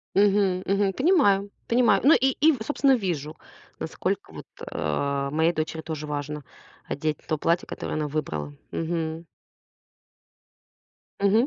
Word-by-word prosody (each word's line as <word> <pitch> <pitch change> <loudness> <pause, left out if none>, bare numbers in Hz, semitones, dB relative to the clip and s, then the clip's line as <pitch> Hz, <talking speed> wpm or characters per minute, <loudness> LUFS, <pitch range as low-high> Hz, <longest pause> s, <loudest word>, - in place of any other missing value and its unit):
Мгм, 195 -2 +3
мгм. 195 0 +2
Понимаю, 205 - +3 0.2
понимаю. 230 -5 +4
Ну, 295 - +8
и 265 +2 +3
и 315 +3 +6
собственно 275 0 +3
вижу, 160 - -3 0.4
насколько - - -3
вот, - - -9 0.3
а, 140 - -1
моей 160 +3 +2
дочери 160 0 -3
тоже 155 -2 -5
важно 150 0 -4 0.4
одеть 155 +2 -2
то 155 - 0
платье, 170 +4 +1
которое - - -4
она 150 -1 -1
выбрала, 80 - -3 0.2
мгм. 165 0 -2 2.0
Мгм. 210 +5 +4
170 Hz, 125 wpm, -26 LUFS, 150-205 Hz, 2.0 s, Ну